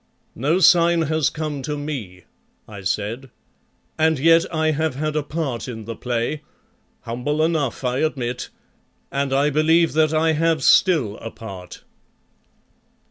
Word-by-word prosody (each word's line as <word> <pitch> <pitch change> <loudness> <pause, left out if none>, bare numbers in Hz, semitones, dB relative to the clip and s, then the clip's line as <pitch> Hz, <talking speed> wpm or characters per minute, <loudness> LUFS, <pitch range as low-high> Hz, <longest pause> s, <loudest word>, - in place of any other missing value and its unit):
"No 150 +8 +1
sign 170 -2 +5
has 155 -1 +1
come 150 -3 -4
to 150 +3 -4
me," 120 - -6 0.4
I 100 -2 -9
said, 105 +8 -3 0.7
"and 160 0 +3
yet 165 +4 +4
I 160 -1 +1
have 155 -2 -1
had 155 +2 -2
a 155 - +1
part 145 -5 -4
in 110 -3 -7
the 115 +1 -6
play, 120 +6 -2 0.6
humble 125 +6 -2
enough, 155 -6 -1
I 125 +1 0
admit, 125 -6 -2 0.6
and 140 0 -1
I 140 +2 +2
believe 160 +3 +3
that 155 0 +3
I 160 +1 +2
have 160 0 +1
still 140 - +4
a 115 - -7
part." 95 -6 -10
150 Hz, 140 wpm, -21 LUFS, 120-160 Hz, 0.7 s, sign